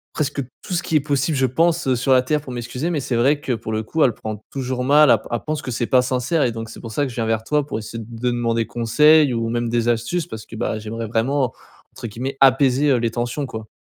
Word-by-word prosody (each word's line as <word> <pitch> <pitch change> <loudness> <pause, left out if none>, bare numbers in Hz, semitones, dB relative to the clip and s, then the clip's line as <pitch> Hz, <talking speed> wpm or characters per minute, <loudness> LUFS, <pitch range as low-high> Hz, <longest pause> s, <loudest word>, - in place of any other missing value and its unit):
presque 145 -2 -1 0.2
tout 190 - -6
qui 160 - -2
est 150 - +5
possible 145 +1 0
je 130 - +3
pense, 165 +5 +1
heu, 130 - +3
sur 130 +2 +2
la 130 - +5
terre 150 +4 0
pour 135 -3 -9
m'excuser. 125 +6 -3
Mais 160 -5 -1
c'est 125 -2 -1
vrai 140 +5 +2
que 135 - -3
pour 110 -2 -3
le 110 0 -1
coup, 160 +9 -2
elle 125 -5 +4
prend 110 -1 -6
toujours 130 -2 -3
mal, 150 +2 +6
elle - - +6
p - - -16
elle 120 - -1
pense 155 -1 -2
que 130 - -5
c'est 120 0 -2
pas 130 -2 +4
sincère 130 +5 0
et 120 - 0
donc 115 0 -6
c'est - - -10
pour 115 -1 -8
ça 145 - 0
que 140 - -1
je 120 - -10
viens 115 - -1
vers 110 0 0
toi 150 +3 0
pour 110 - -3
essayer 115 +1 -7
de 115 +1 -10
demander 115 -1 0
conseil 145 +6 +4
ou 115 -1 -1
même 120 0 -1
des 120 0 0
astuces 120 +9 0
parce 110 -1 -8
que, - - -11
bah 110 0 -2
j'aimerais 110 +1 -5
vraiment 125 +3 0 0.4
entre - - -7
guillemets, 130 +5 -5
«apaiser» 135 +1 +4
heu, - - +4
les 115 -1 -1
tensions 120 +5 -2
quoi. 110 -4 -7
125 Hz, 275 wpm, -21 LUFS, 115-145 Hz, 0.4 s, mal